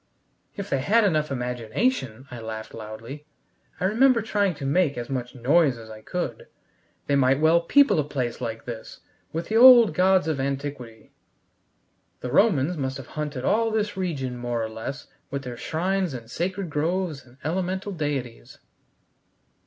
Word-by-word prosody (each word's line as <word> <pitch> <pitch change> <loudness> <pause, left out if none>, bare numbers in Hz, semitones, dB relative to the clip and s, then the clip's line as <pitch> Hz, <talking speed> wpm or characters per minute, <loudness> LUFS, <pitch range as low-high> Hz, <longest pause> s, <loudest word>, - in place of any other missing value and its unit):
"If - - -4
they 140 - 0
had 215 +11 +3
enough 155 -6 +1
imagination," 125 - -2
I 120 - -7
laughed 110 -1 -7
loudly 115 +7 -9 0.5
I - - 0
remember 230 +3 +4
trying 205 -4 0
to 140 - -6
make 145 -1 +2
as 120 +2 -5
much 125 -1 -4
noise 135 +2 +3
as 110 -1 -11
I 110 0 -10
could 180 - -4 0.6
"they 140 - +1
might 135 0 +3
well 160 +2 +4
people 210 - +4
a - - +2
place 130 -4 -3
like 115 -2 -5
this 115 -2 -8 0.3
with 165 +1 -4
the 220 - +2
old 240 -2 +9
gods 185 -1 +3
of 155 -3 -1
antiquity. 135 -4 -5 1.1
The 125 - -4
Romans 180 - +3
must 130 -2 -2
have 135 - -10
haunted 150 -4 -4
all 225 +1 +2
this 215 -2 -1
region 145 -10 -3
more 120 -1 -2
or 110 - -3
less 110 +6 -6 0.2
with 140 0 -4
their 125 -2 -6
shrines 180 +4 -1
and 115 -1 -9
sacred 185 +1 -3
groves 160 0 -1
and 125 0 -21
elemental 185 +4 -2
deities." 140 - -4
145 Hz, 160 wpm, -25 LUFS, 125-185 Hz, 1.1 s, old